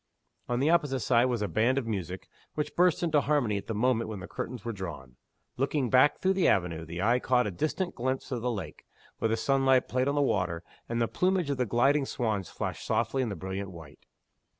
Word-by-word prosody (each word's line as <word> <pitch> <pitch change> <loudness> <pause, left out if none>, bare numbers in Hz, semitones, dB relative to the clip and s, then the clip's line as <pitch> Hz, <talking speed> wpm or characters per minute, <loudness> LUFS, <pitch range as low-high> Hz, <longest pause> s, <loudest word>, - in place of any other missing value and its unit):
On 120 0 0
the 145 +5 +3
opposite 145 -6 +2
side 120 0 +3
was 120 -4 0
a - - 0
band 115 +9 +2
of 135 - 0
music, 95 -4 -4 0.3
which 150 - -3
burst 180 -1 +3
into 155 -4 +3
harmony 140 -8 +1
at 100 - -7
the 115 - -3
moment 115 0 +1
when 105 -3 -5
the 95 - -8
curtains 125 0 -6
were 115 - -1
drawn. 85 -10 -7 0.4
Looking 135 -1 0
back 130 +3 +5
through 190 +1 +2
the 190 -1 +2
avenue, 85 -4 +1
the 85 +3 -4
eye 120 +3 +3
caught 125 -1 +2
a 105 - -2
distant 155 - -2
glimpse 130 +2 -3
of 120 -3 -2
the 125 - 0
lake, 110 -5 -6 0.3
where 115 - +1
the 110 - +1
sunlight 135 0 +3
played 130 +1 0
on 140 - +1
the 145 - +2
water, 90 -9 0 0.3
and 115 0 -1
the 115 - +2
plumage 180 -2 +1
of 140 - -1
the 125 -2 0
gliding 135 +6 +3
swans 105 -7 -2
flashed - - -4
softly 135 - 0
in 125 - -1
brilliant 95 +2 -5
white. 80 -5 -13
120 Hz, 220 wpm, -29 LUFS, 100-135 Hz, 0.4 s, back